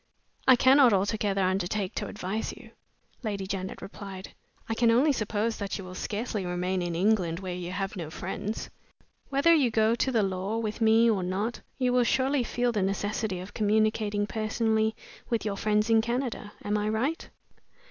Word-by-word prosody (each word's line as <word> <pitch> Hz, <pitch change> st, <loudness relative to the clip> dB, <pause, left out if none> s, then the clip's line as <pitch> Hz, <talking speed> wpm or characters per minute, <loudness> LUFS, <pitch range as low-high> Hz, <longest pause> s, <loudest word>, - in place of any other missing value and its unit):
"I 260 Hz, -, +9 dB
cannot 260 Hz, -1 st, +6 dB
altogether 200 Hz, 0 st, +1 dB
undertake 185 Hz, +1 st, -1 dB
to -, -, -3 dB
advise 210 Hz, +2 st, -3 dB
you," -, -, -14 dB, 0.5 s
Lady 205 Hz, -5 st, -3 dB
Janet 190 Hz, 0 st, -5 dB
replied. 195 Hz, -2 st, -8 dB, 0.3 s
"I 225 Hz, -, -1 dB
can 230 Hz, +1 st, +3 dB
only 255 Hz, +7 st, +4 dB
suppose 215 Hz, -1 st, -1 dB
that 200 Hz, -1 st, -3 dB
you 195 Hz, -, -7 dB
will 185 Hz, 0 st, -9 dB
scarcely 210 Hz, +2 st, -3 dB
remain 180 Hz, +1 st, -1 dB
in 175 Hz, -1 st, -2 dB
England, 180 Hz, -3 st, +1 dB
where 185 Hz, -2 st, -4 dB
you 175 Hz, 0 st, -5 dB
have 195 Hz, +1 st, -3 dB
no 165 Hz, -5 st, -5 dB
friends. 195 Hz, +6 st, -5 dB, 0.6 s
Whether 280 Hz, +5 st, +4 dB
you 285 Hz, -7 st, +4 dB
go 220 Hz, 0 st, +3 dB
to 235 Hz, -2 st, +1 dB
law 190 Hz, +3 st, -2 dB
with 220 Hz, 0 st, -3 dB
me 225 Hz, +1 st, +5 dB
or 215 Hz, -4 st, +2 dB
not, 195 Hz, +6 st, -2 dB, 0.2 s
you 250 Hz, -2 st, +1 dB
will 250 Hz, -1 st, +4 dB
surely 265 Hz, +2 st, +2 dB
feel 245 Hz, +1 st, 0 dB
the 210 Hz, -3 st, -1 dB
necessity 195 Hz, 0 st, -1 dB
of 185 Hz, +3 st, -9 dB
communicating 215 Hz, -1 st, +1 dB
personally 220 Hz, 0 st, 0 dB, 0.3 s
with 230 Hz, -2 st, 0 dB
your 205 Hz, -2 st, -1 dB
friends 210 Hz, +1 st, +1 dB
in 225 Hz, -1 st, +5 dB
Canada. 235 Hz, -3 st, -3 dB
Am 210 Hz, +1 st, 0 dB
I 210 Hz, +1 st, -1 dB
right?" 255 Hz, +9 st, -1 dB
215 Hz, 175 wpm, -28 LUFS, 195-230 Hz, 0.6 s, I